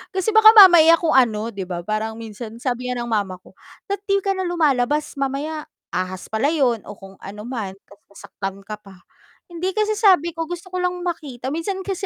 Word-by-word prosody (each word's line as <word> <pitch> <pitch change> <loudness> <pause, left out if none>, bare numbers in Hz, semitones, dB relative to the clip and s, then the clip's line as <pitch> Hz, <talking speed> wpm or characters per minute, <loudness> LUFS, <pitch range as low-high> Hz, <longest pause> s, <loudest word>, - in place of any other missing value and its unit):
kasi 380 +3 0
baka 435 0 +9
mamaya 345 -5 +9
kung 330 -2 0
ano 225 -4 +2
'di 195 -2 -6
ba, 175 -2 -4
parang 215 +2 -3
minsan 225 0 -9
sabi 250 0 -3
nga 250 - -3
ng - - -6
mama 200 -4 -1
ko, - - -18 0.4
"Dapat 400 0 -3
'di 395 0 +3
ka 395 - 0
na 375 - -3
lumalabas 300 -3 0
mamaya 290 +3 -3 0.3
ahas 185 0 -4
pala 220 +6 +1
yun 245 -8 +1
o - - -7
kung 195 -1 -14
ano 205 +2 -8
man, 225 -7 -4 0.2
ta's 200 - -18
nasaktan 195 -1 -7
ka 215 - -5
pa." 195 -3 -16 0.5
Hindi 355 +2 -3
kasi 430 0 0
sabi 370 -7 +4
ko 330 0 -5
gusto 350 +2 -8
ko 365 - -5
lang 360 0 0
makita, 295 -8 -5
minsan 330 +6 -3
kasi 390 0 -4
275 Hz, 205 wpm, -21 LUFS, 215-355 Hz, 0.5 s, baka